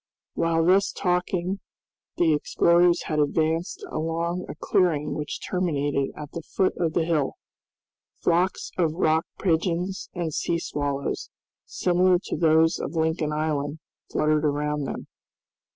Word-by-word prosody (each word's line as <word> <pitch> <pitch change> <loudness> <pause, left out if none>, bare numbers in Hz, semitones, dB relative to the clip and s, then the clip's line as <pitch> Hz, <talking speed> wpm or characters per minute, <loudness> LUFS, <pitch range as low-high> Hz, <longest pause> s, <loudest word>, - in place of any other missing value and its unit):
While 165 0 +1
thus 190 +3 +4
talking 180 +1 -1 0.6
the 165 -2 +4
explorers 170 +3 +3
had 155 -1 -1
advanced 165 - 0
along 170 +3 -2
a - - -5
clearing 150 -5 +1
which 150 -1 -5
terminated 145 -6 0
at 150 -1 -7
the 170 - -5
foot 185 +4 0
of 165 -2 0
the 165 - +1
hill. 155 -5 +1 0.9
Flocks 175 +2 +1
of 165 -3 +2
rock 160 -2 +2
pigeons 180 +2 0
and 170 -3 -2
sea 170 - 0
swallows, 145 -4 -3 0.4
similar 180 0 +3
to - - -3
those 160 0 +4
of - - -4
Lincoln 160 -1 0
Island, 150 -1 -1 0.3
fluttered 155 0 +2
around 150 0 0
them. - - -5
165 Hz, 130 wpm, -25 LUFS, 150-175 Hz, 0.9 s, thus